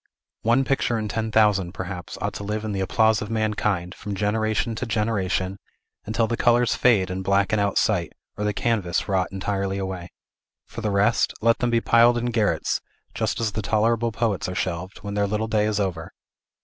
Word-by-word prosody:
One 120 +4 +3
picture 130 -3 0
in 110 -1 -2
ten 110 +1 -2
thousand, 105 -5 +3
perhaps, 90 -1 -6
ought - - -2
to - - -6
live 105 +1 -3
in 110 - -2
the 100 - -2
applause 110 +3 +2
of 105 - -5
mankind, 105 -5 -1
from 100 -1 -6
generation 110 +3 0
to 130 - -3
generation, 100 -4 -1 0.5
until 115 +1 +1
the 115 - -1
colors 120 0 +3
fade 100 -7 +3
and 95 +1 -3
blacken 100 +2 +2
out 100 -1 +1
of - - -2
sight, 85 -9 +1 0.2
or 105 - -4
the 105 - +1
canvas 105 -5 -1
rot 95 -2 +1
entirely 95 0 -2
away. 95 -2 -5 0.6
For - - -8
the 110 - -1
rest, 105 +4 +2
let 115 +1 +3
them 120 - +1
be 115 -1 +2
piled 120 +1 +5
in 120 +1 -1
garrets, 105 -8 0 0.3
just - - -1
as 115 -2 0
the 110 - -3
tolerable 115 +3 +1
poets 110 -4 -1
are 90 - -5
shelved, 90 +2 -4
when 100 -1 -5
their 100 0 +1
little 105 +2 -1
day 110 -1 +1
is 105 -1 0
over. 90 -5 -3
105 Hz, 200 wpm, -24 LUFS, 95-115 Hz, 0.6 s, piled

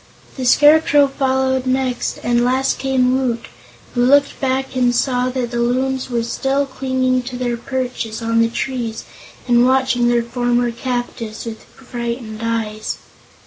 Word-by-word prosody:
The 260 - -4
Scarecrow 295 +1 +6
followed 265 -1 0
next 255 -1 -1
and 240 0 +2
last 260 +2 +1
came 260 -1 +2
Woot, 245 -3 -1 0.5
who 245 - +1
looked 280 +3 +3
back 265 0 -1
and 245 -1 +2
saw 250 0 +1
that 250 -2 -3
the 240 - -2
Loons 260 +2 0
were 235 -2 -1
still 270 +4 0
clinging 260 -1 0
to 250 0 -7
their 245 -1 -1
perches 245 -2 -4
on 230 0 +1
the 230 - +2
trees 235 -2 -3 0.4
and 240 -1 +4
watching 260 -1 +2
their 240 -1 +2
former 245 0 0
captives 240 -3 -4
with 225 -1 -7
frightened 235 -3 -6
eyes. 225 -2 -2
250 Hz, 145 wpm, -19 LUFS, 235-265 Hz, 0.5 s, Scarecrow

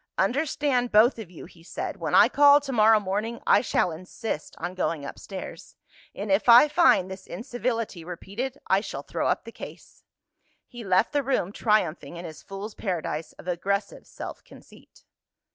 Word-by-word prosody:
"Understand, 260 +2 0
both 230 +3 +5
of 210 -6 -8
you," 175 - -11
he 170 -1 -17
said, 165 - -5
"when - - -1
I - - +8
call 285 0 +6
to 275 -1 -6
morrow 220 -2 +5
morning, 210 +4 -3
I - - +5
shall 180 - 0
insist 180 +1 -6
on 180 - -5
going 165 -5 -2
upstairs 190 +6 -9 0.4
and 200 0 -4
if 195 +5 +2
I 240 +5 +9
find 255 - +4
this 190 0 -9
incivility 230 -3 -4
repeated, 200 +10 -6
I 190 +1 +2
shall - - -6
throw - - -2
up - - 0
the - - -10
case." - - -12 0.6
He 240 -1 -10
left 190 +2 +2
the 290 - +2
room, 255 -9 -1
triumphing 185 -6 0
in 175 - -7
his 160 -2 -9
fool's 200 +2 -8
paradise 165 -6 -4
of - - -15
aggressive 200 +3 -2
self - - -8
conceit. - - -18
205 Hz, 170 wpm, -26 LUFS, 180-245 Hz, 0.6 s, I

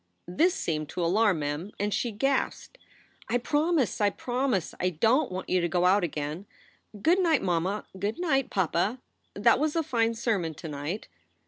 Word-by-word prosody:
This 335 - +2
seemed 155 - -2
to 175 - -2
alarm 200 +1 +3
Mem, 145 +7 -3
and 205 0 0
she 240 - 0
gasped: 270 - -1 0.3
" - - -27
I 240 - +2
promise. 295 - +1
I 205 - +4
promise! 245 -4 -1
I 180 - +1
don 225 - +2
t - - -8
want 185 - -5
you 185 -1 +2
to 170 - +1
go 175 +2 +1
out 190 +2 +4
again. 155 +3 -4 0.6
Good 350 +4 +4
night, 330 -7 +3
mamma. 185 +3 -1
Good 205 +3 -2
night, 270 -7 +1
papa. 190 +5 0 0.4
That - - +4
was 305 +1 0
a 330 - +2
fine 230 -4 +1
sermon 195 -9 -1
to 165 - -8
night." 150 +7 -5
205 Hz, 185 wpm, -28 LUFS, 175-260 Hz, 0.6 s, I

